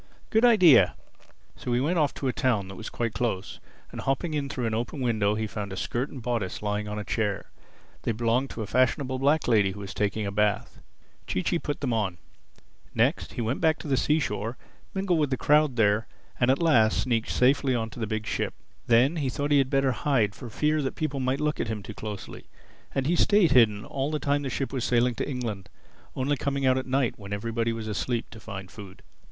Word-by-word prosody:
Good 220 +1 +3
idea!" 175 - +6 0.6
So 125 - -3
he 120 - +2
went 165 +6 +1
off 150 -2 +2
to 135 - -3
a 125 - 0
town 105 -7 0
that 95 - -8
was 110 - -7
quite 115 -2 -2
close, 110 -3 -2 0.3
and - - -6
hopping 135 +4 -1
in 145 -2 -2
through 125 -3 -3
an 110 - -1
open 120 +6 -3
window 110 -5 +1
he 110 0 -1
found 105 -2 -5
a 95 - -6
skirt 125 +8 -2
and 130 -4 -9
bodice 115 -6 -2
lying 105 0 -1
on 105 0 -4
a 105 - -3
chair. 105 -2 -2 0.5
They - - -1
belonged 120 +4 0
to 110 - -5
a - - -4
fashionable 130 +4 +1
black 145 +4 +2
lady 105 -5 +3
who 105 - -10
was 100 -1 -7
taking 105 +1 -1
a 100 - -2
bath. 105 0 0 0.5
Chee 90 - -1
Chee 170 - +1
put 145 -2 -4
them 130 -4 0
on. 100 -6 -1 0.8
Next - - +1
he - - -3
went 115 +4 -2
back 160 -1 +3
to - - -8
the 140 - +2
seashore, 125 -4 0 0.4
mingled 190 -3 +1
with 150 -2 +1
the 130 - 0
crowd 150 -2 +3
there 105 -1 +2 0.3
and 120 - +3
at 135 - +4
last 120 -10 +3
sneaked 115 -3 0
safely 130 0 +3
on 115 -1 -2
to - - -10
the 110 - -2
big 110 0 -3
ship. - - -2 0.3
Then 125 +8 +4
he 140 -4 0
thought 145 +2 -2
he 145 - +6
had 135 -1 +1
better 135 -1 +2
hide, 120 -6 +1
for 120 +4 -9
fear 150 +7 +1
people 145 -2 -3
might 130 +1 0
look 150 0 -1
at - - -1
him 110 -2 -4
too 110 - -8
closely. 105 -2 -7 0.5
And 135 - 0
he 170 +5 +2
stayed 200 0 +4
hidden 110 -4 +4
all 135 +1 -2
the 155 - -1
time 145 0 0
the 140 - -3
ship 135 +2 -3
was 130 -3 -2
sailing 120 0 +2
to 115 - -3
England—only 125 +3 -5
coming 140 0 -1
out 130 0 +4
at 130 - -6
night, 130 -3 0
when 100 -1 -9
everybody 115 +3 -1
was 115 -1 -5
asleep, 115 +3 -2
to 115 - -10
find 95 -3 -8
food. 100 -3 -11
120 Hz, 225 wpm, -27 LUFS, 110-140 Hz, 0.8 s, idea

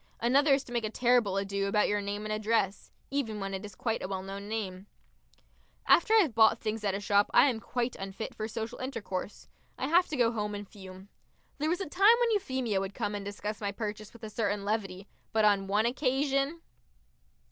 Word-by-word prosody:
Another 275 +5 +3
is 275 - -3
to 245 - -13
make 235 -1 0
a 215 - -1
terrible 235 -4 +2
ado 200 0 -1
about 210 +1 +2
your 205 0 0
name 205 +1 -4
and 215 - -2
address 215 -2 0 0.2
even 235 -7 -2
when 195 0 -4
it 190 +1 -4
is 205 -2 -9
quite 225 +1 -2
a - - -3
well 190 -1 -4
known 200 +1 -7
name. 200 -3 -4 1.0
After 435 +6 +5
I 440 - +8
have 310 - 0
bought 220 0 +5
things 215 0 -3
at 200 -2 0
a - - -2
shop 205 0 +2
I - - +8
am 240 -5 0
quite 245 +2 -2
unfit 195 +3 -6
for 215 - -4
social 225 0 -5
intercourse. 220 -7 -5 0.3
I - - -2
have 350 +4 +4
to 305 - -4
go 235 -2 +3
home 210 -2 -3
and 205 0 -7
fume. 190 -1 -12 0.5
There 305 +2 0
was 350 +3 0
a - - -2
time 395 +9 +6
when 480 -1 +2
Euphemia 260 - 0
would 195 +1 -4
come 205 - -2
and 205 -1 -4
discuss 205 +1 -5
my 200 -1 -1
purchase 210 0 -5
with 235 0 -16
a 215 - -6
certain 205 -2 -1
levity, 200 -2 -2 0.3
but 220 -1 +3
on 200 -2 +3
one 205 +3 +2
occasion.... 275 +4 0
215 Hz, 215 wpm, -30 LUFS, 200-250 Hz, 1.0 s, I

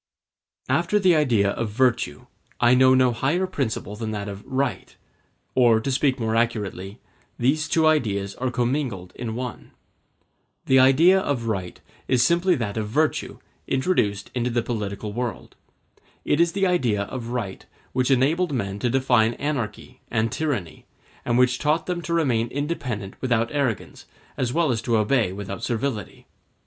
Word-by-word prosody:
After 210 - +1
the 185 -4 +4
idea 115 -10 +2
of 115 +1 -3
virtue, 120 +2 0 0.3
I 120 0 +5
know 130 0 +6
no 130 -1 +4
higher 145 +10 0
principle 120 - -3
than 110 0 -4
that 105 -1 -4
of 100 0 -7
right; 135 +1 -2 0.6
or, 120 -3 +4
to 135 +5 -2
speak 130 0 +1
more 110 -1 -1
accurately, 105 -3 -2 0.4
these 150 +6 +1
two 160 -1 +3
ideas 105 -11 +1
are 130 0 -1
commingled 120 -6 -2
in 115 -2 -5
one. 125 -3 -6 0.9
The 130 0 +5
idea 155 +9 +6
of 140 -10 -2
right 95 -5 -3 0.3
is 125 -2 +3
simply 175 +1 +3
that 110 -6 -3
of 105 -1 -2
virtue 155 +7 0 0.3
introduced 120 - 0
into 125 0 -1
the 120 -1 0
political 105 -3 -4
world. 120 -2 -5 0.7
It 145 - +1
is 170 0 +3
the 195 -1 +1
idea 125 - +1
of 120 +2 -6
right 115 -6 -4 0.3
which 130 0 +1
enabled 150 +7 +2
men 100 -5 -3
to 120 - 0
define 120 -3 +2
anarchy 125 -3 -4
and 110 -1 0
tyranny; 115 - -3 0.4
and 120 - +1
which 125 0 +3
taught 155 +2 +1
them 175 -1 -2
to 170 - -4
remain 125 -8 +1
independent 125 -8 -4
without 120 -3 +1
arrogance, 140 -7 -2 0.3
as 125 -2 -1
well 165 0 +2
as 115 -2 -1
to 115 -1 +1
obey 110 -2 +2
without 100 0 -6
servility. 115 -4 -3
125 Hz, 155 wpm, -24 LUFS, 110-140 Hz, 0.9 s, know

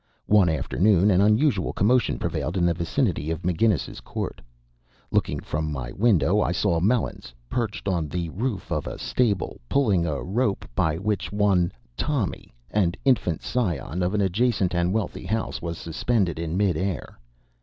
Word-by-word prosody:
One 100 -4 +5
afternoon 95 +6 +3
an 95 0 +4
unusual 105 0 +3
commotion 120 +5 +2
prevailed 85 +5 -2
in 85 - +2
the 85 - +3
vicinity 85 - -1
of 80 -1 -3
McGinnis's 90 0 +1
Court. - - -5 0.7
Looking - - +1
from 75 0 -3
my 65 -4 -4
window 105 - +3
I 90 - +1
saw 85 -1 +1
Melons 100 - -1 0.2
perched 110 -5 -2
on 85 -5 0
the 85 +2 -3
roof 110 +4 -3
of - - -1
a - - -5
stable, 110 - -1
pulling 100 -11 +2
up 75 -3 -1
a 65 - -5
rope 105 - 0
by 80 +5 +1
which 100 +3 -2
one 100 -4 +2 0.2
"Tommy," 135 - -2 0.2
an 95 -5 +2
infant 115 - +2
scion 90 - -1
of 90 +3 0
an 105 - +2
adjacent 100 -1 +1
and 85 0 +1
wealthy 105 -1 -2
house, 110 +3 -2
was 85 -1 -4
suspended 85 0 -1
in 85 +1 -2
mid 95 -5 +2
air. 90 -7 -3
95 Hz, 165 wpm, -25 LUFS, 85-105 Hz, 0.7 s, One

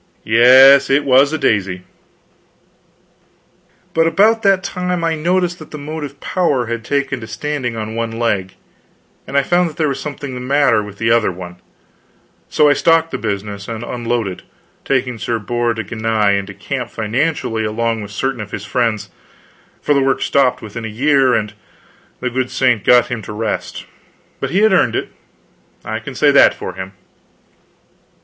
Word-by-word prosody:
Yes, 130 +5 +7
it 140 +2 +3
was 135 +2 +4
a 160 - -1
daisy. 95 -8 0 2.1
But 165 0 +3
about 215 +7 +3
that 195 -3 +3
time 180 -2 -3
I 165 0 +1
noticed 175 +2 0
that 155 - -11
the 150 - -8
motive 145 -1 -7
power 145 -9 0
had 115 0 -4
taken 140 0 -1
to 110 - -8
standing 125 +1 -4
on 110 0 -5
one 115 0 -2
leg, 100 -5 -1 0.7
and 140 - -2
I 140 - +4
found 175 +3 +2
that 155 - -14
there 155 -2 +1
was 135 -1 -2
something 140 -1 -6
the 125 - -5
matter 130 -3 +2
with 105 -1 -10
the 115 +1 0
other 115 -4 +3
one; 90 0 -9 0.9
so 150 - +3
I 145 - +5
stocked 165 +1 +2
the - - -4
business 100 -1 -4
and 115 0 -5
unloaded, 120 -5 -3 0.4
taking 125 -3 -1
Sir 115 +2 -2
Bors 120 +2 -1
de 110 - -3
Ganis 110 -3 0
into 100 0 -8
camp 125 +4 -5
financially 115 0 -2
along 115 +1 -1
with 100 - -8
certain 120 +3 -3
of 105 - -7
his 100 0 -6
friends; 110 0 -1 0.7
for 145 - +2
the 140 - +2
works 135 0 +1
stopped 135 -3 +1
within 110 +2 -7
a - - -3
year, 130 +3 +2
and 105 -1 -2 0.7
the 125 - -2
good 130 +1 -1
saint 125 -5 +1
got 125 -1 +5
him 120 -2 -3
to 105 - -8
his 105 - -8
rest. 110 -2 -4 0.5
But - - -3
he 195 - +1
had 220 -2 +4
earned - - +3
it. - - -2 0.8
I - - -3
can - - -9
say - - +4
that - - +6
for - - -6
him. 95 +1 -8
125 Hz, 175 wpm, -17 LUFS, 110-145 Hz, 2.1 s, Yes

